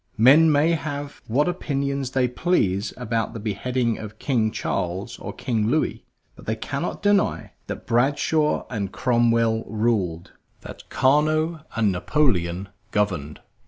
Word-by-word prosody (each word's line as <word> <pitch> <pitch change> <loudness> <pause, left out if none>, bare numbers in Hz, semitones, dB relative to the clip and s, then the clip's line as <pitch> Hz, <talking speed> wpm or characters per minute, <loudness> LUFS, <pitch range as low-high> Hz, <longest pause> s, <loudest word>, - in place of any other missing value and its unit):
Men 145 +8 +7
may 150 +3 +3
have 145 -3 -4
what 140 +8 +2
opinions 140 -6 -2
they 130 -1 +1
please 115 - 0
about 115 0 -2
the 115 - -6
beheading 115 +3 -1
of 110 -1 -8
King 115 -6 +1
Charles 95 -2 -3
or - - -6
King 110 -3 -1
Louis, 150 +7 0 0.3
but - - -15
they 110 - 0
cannot 140 - -4
deny 205 -1 +2 0.2
that - - -6
Bradshaw 145 +5 +1
and 100 -5 -3
Cromwell 115 0 +2
ruled, 105 -7 -1 0.3
that - - -11
Carnot 155 +4 +2
and 110 -3 +2
Napoleon 95 - 0 0.2
governed. 90 -8 -1
120 Hz, 130 wpm, -24 LUFS, 105-145 Hz, 0.3 s, Men